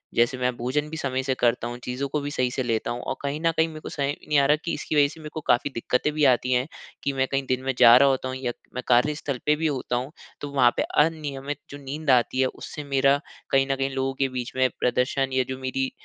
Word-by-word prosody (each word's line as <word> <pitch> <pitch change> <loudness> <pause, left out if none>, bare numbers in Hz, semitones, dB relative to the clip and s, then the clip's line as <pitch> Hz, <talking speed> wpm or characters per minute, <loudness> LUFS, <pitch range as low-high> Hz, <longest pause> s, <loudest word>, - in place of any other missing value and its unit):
जैसे 120 +3 +2
मैं 125 0 +1
भोजन 140 +6 -1
भी 160 - -6
समय 130 -3 -2
से 135 0 0
करता 120 -1 +1
हूँ, 120 0 -6
चीज़ों 125 +3 -3
को 150 - -1
भी 145 +1 -4
सही 130 -3 0
से 130 - -2
लेता 115 -1 -1
हूँ। 120 +1 -4
और - - -3
कहीं 140 +1 -2
न 165 0 +3
कहीं 160 - +4
मेरे 155 -1 -8
को - - -7
समझ 140 - -2 0.2
नहीं 150 - +2
आ 140 - +4
रहा 150 - +5
कि 170 - -1
इसकी - - -3
वजह 145 -1 +5
से 160 - -12
मेरे 155 - -7
को 155 - -4
काफ़ी 120 +4 +3
दिक्कतें 125 +5 0
भी 150 -1 +2
आती 125 -1 +3
हैं 125 +2 +1 0.4
कि 140 - 0
मैं 135 0 0
कहीं 135 0 0
दिन 130 0 +1
में 135 0 0
जा 115 - +9
रहा 140 +1 +6
होता 130 -1 -1
हूँ 130 - -4
या 130 -2 -2 0.2
मैं 125 - -3
कार्यस्थल 140 +2 +1
पे 150 - +4
भी 160 +1 0
होता 130 -4 -2
हूँ। 130 +4 -4 0.3
तो 145 - -4
वहाँ 130 -4 +4
पे - - +2 0.2
अनियमित 145 -3 -4
जो 145 - -8
नींद 145 +3 -5
आती 125 0 +2
है 130 - +3
उससे 150 +3 -8
मेरा 140 0 +3 0.3
कहीं 135 0 +3
न - - +2
कहीं 135 0 -1
लोगों 135 0 -1
के 135 -1 +2
बीच 125 -1 -4
में 130 0 +3
प्रदर्शन 130 +2 0
या 130 0 +3
जो 130 - -3
मेरी 130 0 -2
135 Hz, 275 wpm, -25 LUFS, 125-145 Hz, 0.4 s, जा